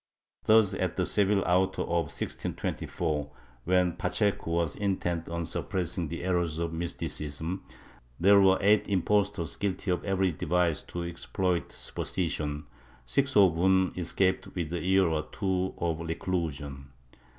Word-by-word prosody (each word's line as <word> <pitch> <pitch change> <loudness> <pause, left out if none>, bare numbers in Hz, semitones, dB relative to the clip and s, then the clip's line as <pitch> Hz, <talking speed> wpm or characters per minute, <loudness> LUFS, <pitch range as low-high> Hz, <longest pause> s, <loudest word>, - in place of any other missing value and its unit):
^ - - -25
Thus 110 -3 +6
at - - -1
the - - 0
Seville 100 -1 +2
auto 90 +2 +2
of 85 -1 -1
1624, 75 -4 -3 0.4
when 90 0 +3
Pacheco 100 -5 0
was 85 -2 0
intent 85 -5 -1
on 85 0 -3
suppressing 90 -1 -2
the 85 +2 -5
errors 85 -4 0
of 85 0 -2
Mysticism, 80 0 -3 0.6
there 100 +3 +6
were 95 -1 +5
eight 105 +2 +4
impostors 100 -3 +1
guilty 100 -1 -2
of 90 - -1
every 95 -2 +1
device 85 0 0
to 85 - -6
exploit 85 +1 -2
superstition, 75 -5 -3 0.4
six 140 - +1
of 95 -5 +7
whom 95 +2 +3
escaped 95 +2 0
with 85 -2 -3
a 85 - -2
year 95 +1 +4
or 80 -1 -1
two 95 -2 -1
of 85 -2 -1
reclusion. 80 -5 -3
90 Hz, 140 wpm, -29 LUFS, 80-95 Hz, 0.6 s, of